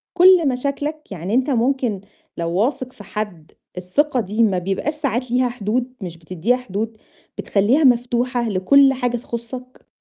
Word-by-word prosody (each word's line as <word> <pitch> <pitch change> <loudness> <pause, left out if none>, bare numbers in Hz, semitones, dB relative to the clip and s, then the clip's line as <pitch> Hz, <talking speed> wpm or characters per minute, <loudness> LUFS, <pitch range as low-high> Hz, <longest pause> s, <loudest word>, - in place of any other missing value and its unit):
كلّ 365 -3 +6
مشاكلك؟ 280 +3 -3
يعني 185 +2 -4
أنت 260 +4 +2
ممكن 245 -5 0 0.4
لو 170 0 -2
واثق 255 +7 -1
في 205 - -12
حد 200 -8 -6 0.3
الثقة 255 +10 0
دي 215 +1 0
ما 200 -4 +2
بيبقاش 195 - -2
ساعات 255 -5 -2
ليها 250 0 +2
حدود، 245 +2 -2
مش 175 -3 -6
بتدّيها 185 +8 -1
حدود؟ 225 -2 -4 0.4
بتخلّيها 225 +10 +2
مفتوحة 245 -1 +2
لكلّ 270 +8 +5
حاجة 245 -2 -1
تخصّك؟ 245 +2 -8
245 Hz, 145 wpm, -20 LUFS, 205-260 Hz, 0.4 s, كلّ